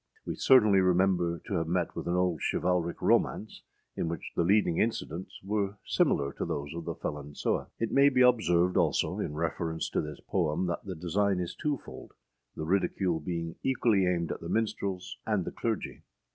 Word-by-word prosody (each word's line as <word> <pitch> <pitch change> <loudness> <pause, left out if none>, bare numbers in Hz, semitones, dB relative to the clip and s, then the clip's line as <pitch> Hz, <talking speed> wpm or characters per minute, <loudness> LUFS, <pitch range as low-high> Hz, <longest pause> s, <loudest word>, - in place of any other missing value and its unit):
We - - -2
certainly 110 -7 +5
remember 90 -2 +2
to - - -5
have 80 -1 -1
met 85 0 -1
with - - -5
an 85 - +1
old 90 -4 +1
chivalric 90 -1 0
romance, 110 - +1 0.3
in - - -2
which 80 -2 -5
the - - +2
leading 90 -1 +3
incidents 95 -5 -2
were 100 0 -1
similar 70 0 +1
to - - 0
those 70 +1 -4
of 85 -1 -6
the - - -3
Felon 75 0 -6
Sewe. - - -1
It 115 - -2
may 140 +1 +6
be 130 -2 +2
observed, 90 -8 +4
also, 85 -5 +1
in 75 - -3
reference 80 +1 -2
to - - +1
this 75 -1 -7
poem, 85 -1 0
that 85 -1 -3
the 95 -2 -5
design 95 +3 0
is 90 -1 -3
twofold, 145 -4 -5 0.4
the 80 - -4
ridicule 90 -1 +1
being 85 -2 -4
equally 115 -7 +2
aimed 85 -2 0
at - - -4
the - - -6
minstrels 100 -4 -2
and 105 -5 +1
the - - -4
clergy. 115 -4 -3
90 Hz, 185 wpm, -29 LUFS, 85-100 Hz, 0.4 s, may